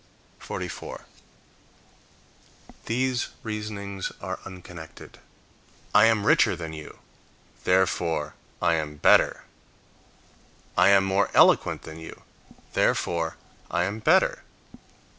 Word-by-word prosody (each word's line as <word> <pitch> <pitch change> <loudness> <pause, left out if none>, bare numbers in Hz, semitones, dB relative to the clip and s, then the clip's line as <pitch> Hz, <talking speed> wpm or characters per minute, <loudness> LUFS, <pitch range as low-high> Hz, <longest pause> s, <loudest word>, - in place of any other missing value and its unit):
44. - - -7 1.8
These 125 +1 0 0.2
reasonings 105 -3 -5
are - - -5
unconnected: 90 -3 -11 0.7
"I - - +7
am 110 -3 +2
richer 100 - +4
than 80 -2 -7
you, 75 -1 -10 0.7
therefore 85 -4 +1 0.3
I 85 -1 +4
am 75 -2 -2
better"; 75 - +4 1.3
"I 90 +2 +5
am 100 -1 +6
more 95 +1 +1
eloquent - - +4
than 80 +1 -9
you, 80 - -11 0.5
therefore 85 -1 0 0.3
I 85 - 0
am 100 +4 -3
better." 110 - +3
90 Hz, 95 wpm, -26 LUFS, 80-100 Hz, 1.8 s, I